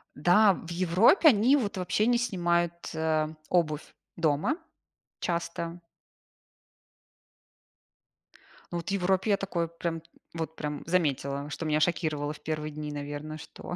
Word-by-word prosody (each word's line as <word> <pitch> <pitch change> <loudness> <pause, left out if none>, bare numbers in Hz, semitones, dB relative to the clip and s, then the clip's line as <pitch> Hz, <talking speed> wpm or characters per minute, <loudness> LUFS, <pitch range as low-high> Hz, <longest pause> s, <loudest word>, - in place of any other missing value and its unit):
Да, 185 +7 +5
в 170 - -9
Европе 185 - +5
они 245 +3 +5
вот 210 -8 -1
вообще 185 +3 +1
не 240 +1 +4
снимают, 175 -7 +1 0.2
а, 155 -1 +1 0.2
обувь 155 -4 0 0.2
дома. 160 - +1 0.6
Часто. 170 0 -3 2.9
Ну, 175 - -2
вот 170 - -5
в - - -2
Европе 190 +2 +1
я 200 - +4
такое 175 -4 -2
прям, 165 0 -4 0.3
вот 160 -1 -4
прям 150 -2 -4
заметила, 145 -4 0
что 160 - -5
меня 155 -1 +2
шокировало 155 -3 0
в - - -14
1 155 -1 -3
дни, 150 0 -5
наверно, 145 +1 -5
что 175 - -8
170 Hz, 130 wpm, -28 LUFS, 155-185 Hz, 2.9 s, Да